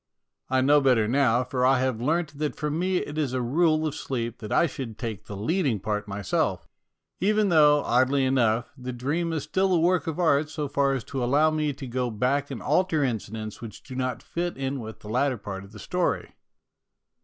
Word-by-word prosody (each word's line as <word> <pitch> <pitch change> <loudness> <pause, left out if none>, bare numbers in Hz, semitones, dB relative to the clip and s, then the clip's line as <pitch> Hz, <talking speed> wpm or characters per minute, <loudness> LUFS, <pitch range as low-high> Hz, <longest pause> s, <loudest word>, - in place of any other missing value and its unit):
I 130 0 +2
know 145 +2 +5
better 125 -5 +3
now, 125 -1 +3
for 125 0 -2
I 130 0 +4
have 130 -3 -1
learnt 155 +1 -1
that 150 -1 -1
for 150 -1 -2
me 180 +4 0
it 150 -3 -3
is 140 -5 -1
a 130 - 0
rule 155 +4 +2
of 155 - -1
sleep 120 -5 -4
that 105 -2 -7
I - - +4
should 130 -8 -6
take 115 -6 -5
the 100 - -6
leading 135 - 0
part 105 +1 -3
myself, 100 -2 -1 0.5
even 210 +1 +2
though, 150 -3 +5
oddly 130 +3 +2
enough, 120 -3 +1
the 125 -2 -6
dream 150 +8 -1
is 160 -3 -2
still 190 +5 +1
a - - +3
work 180 +1 +2
of 160 - -2
art 155 -3 +3
so 150 -2 -3
far 140 0 +1
as 130 -4 -2
to 135 -3 -4
allow 145 +6 +3
me 155 -1 0
to 135 - -8
go 125 0 -2
back 130 +6 0
and 130 -6 -6
alter 175 -5 +2
incidents 110 -3 -4
which 115 -3 -9
do 130 - -10
not 130 -2 -2
fit 175 -2 -3
in 135 0 -2
with 110 -2 -8
the - - -11
latter 125 +4 +1
part 100 -2 -7
of 100 - -14
the 105 - -12
story. 180 - -2
135 Hz, 210 wpm, -26 LUFS, 120-155 Hz, 0.5 s, know